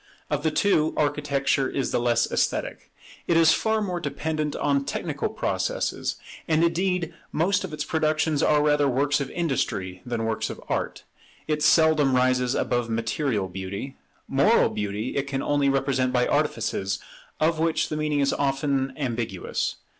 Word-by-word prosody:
Of 145 -1 0
the 160 - +1
two, 155 -2 +2
Architecture 145 -2 +1
is 135 - -2
the - - +1
less 120 -1 +1
esthetic. - - -1 0.4
It 170 - +3
is 160 -1 +6
far 220 -1 +1
more 180 -3 -2
dependent 155 -3 -2
on 140 -1 +1
technical - - -3
processes; - - -2 0.3
and 160 +1 +3
indeed 175 0 0 0.2
most 195 +5 +1
of 190 - -5
its 150 0 -4
productions 155 -1 +1
are 150 -1 +3
rather 150 -1 +3
works 140 +3 +1
of 135 - -3
industry 100 - -2
than 120 -2 -3
works 115 -1 -1
of - - -7
art. - - -3 0.4
It 155 -1 0
seldom 155 -4 +4
rises 125 0 +2
above 120 -1 0
material 115 -2 -1
beauty: 95 +7 -6 0.3
moral - - +4
beauty 105 +3 -3
it 140 0 -1
can 135 -1 -2
only 145 -1 +2
represent 135 -1 +1
by 125 -1 +2
artifices, 95 0 0 0.4
of 160 +1 +2
which 165 0 +1
the - - -2
meaning 150 -1 0
is 140 - +2
often 135 -1 0
ambiguous. 115 -9 -2
140 Hz, 155 wpm, -25 LUFS, 125-155 Hz, 0.4 s, is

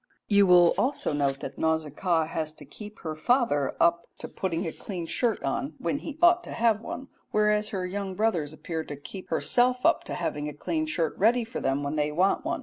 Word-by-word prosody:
You 200 -2 +5
will 175 -1 +7
also 280 - 0
note 140 -2 0
that 135 - -7
Nausicaa 160 +1 +1
has 155 -1 -4
to 145 - -11
keep 210 +9 -9
her 155 -2 -4
father 155 - +1
up 170 0 +3
to - - -7
putting 175 -4 -3
a 165 - -2
clean 180 -2 -6
shirt 230 +5 0
on 135 +2 -2
when 225 +12 -2
he 305 -1 -7
ought 345 0 +6
to - - -7
have 230 -2 +2
one, 265 +3 -6 0.2
whereas 210 0 +2
her 185 -2 -3
young 195 0 -4
brothers 180 -9 0
appear 160 +1 -5
to 145 - -7
keep 185 +7 -9
herself 250 +1 +2
up 335 0 +4
to - - -4
having 150 -3 -3
a - - -8
clean 315 - -2
shirt 165 - -1
ready 235 +4 +4
for 230 +2 -6
them 135 +2 0
when 145 +2 -2
they 150 0 +1
want 185 +6 +2
one. 335 +1 -2
180 Hz, 215 wpm, -27 LUFS, 155-225 Hz, 0.2 s, will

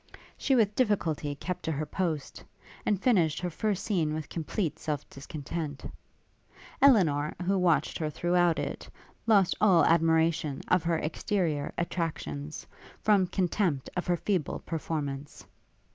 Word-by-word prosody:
She 270 - +1
with 215 -4 +3
difficulty 170 - 0
kept 180 +5 -4
to 160 - 0
her 150 +2 -2
post, 155 -3 -3 0.4
and 205 -3 +2
finished 180 - +2
her 180 0 -3
first 205 +2 -1
scene 160 -7 0
with 155 -2 -5
complete 165 +1 -3
self 150 -3 -3
discontent. 145 +1 -6 1.0
Elinor, 160 - +4
who 195 +2 +2
watched 175 -3 +2
her 155 -2 -1
throughout 175 +1 +2
it, - - -4 0.4
lost 200 -5 +5
all 190 -6 +6
admiration 160 -3 +2
of 180 - +4
her 165 -1 +2
exterior 160 -2 -1
attractions, 160 -4 -3 0.3
from 200 -4 +3
contempt 175 -5 0
of 180 - -2
her 175 -1 +2
feeble 180 -4 -1
performance. 145 -3 -4
165 Hz, 130 wpm, -29 LUFS, 150-190 Hz, 1.0 s, all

